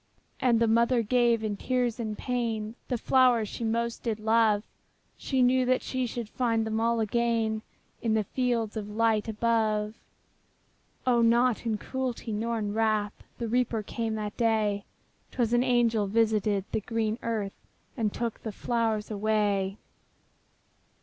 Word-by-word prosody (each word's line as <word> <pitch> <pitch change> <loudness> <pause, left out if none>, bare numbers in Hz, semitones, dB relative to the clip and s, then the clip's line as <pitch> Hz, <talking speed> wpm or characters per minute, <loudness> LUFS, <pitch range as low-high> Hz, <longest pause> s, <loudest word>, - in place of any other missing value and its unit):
'' - - -42
And 240 -3 +3
the 230 - +3
mother 235 +2 +3
gave, 235 0 +2
in 210 -2 -2
tears 245 -1 -1
and 215 -2 -3
pain, 230 -4 -2
The 245 - -1
flowers 245 -2 +3
she 235 - -6
most 230 +1 -1
did 225 -3 -2
love; 220 -1 +3 0.5
She 265 -2 0
knew 255 0 +3
she 255 -1 -2
should 235 -1 -5
find 230 -1 0
them 220 0 -1
all 230 0 +1
again 225 0 0 0.4
In 225 -2 +1
the 215 - +2
fields 235 -1 -1
of 210 -1 -4
light 220 0 +1
above. 215 -1 0 1.1
O, 245 -2 +3
not 235 +1 +3
in 220 -2 0
cruelty, 250 -1 -4
not 230 +3 -1
in 205 -2 -2
wrath, 215 -2 +1 0.2
The 235 - -3
Reaper 235 -2 0
came 225 +1 -3
that 210 -1 -4
day; 215 -3 +1 0.4
'Twas 240 -2 0
an 240 - +4
angel 235 -4 +2
visited 210 -2 +1
the - - -1
green 225 +1 -2
earth, 215 -4 -2 0.4
And 220 -4 0
took 235 0 -4
the 220 - -4
flowers 225 -1 -1
away. 205 -2 0
225 Hz, 150 wpm, -28 LUFS, 215-235 Hz, 1.1 s, an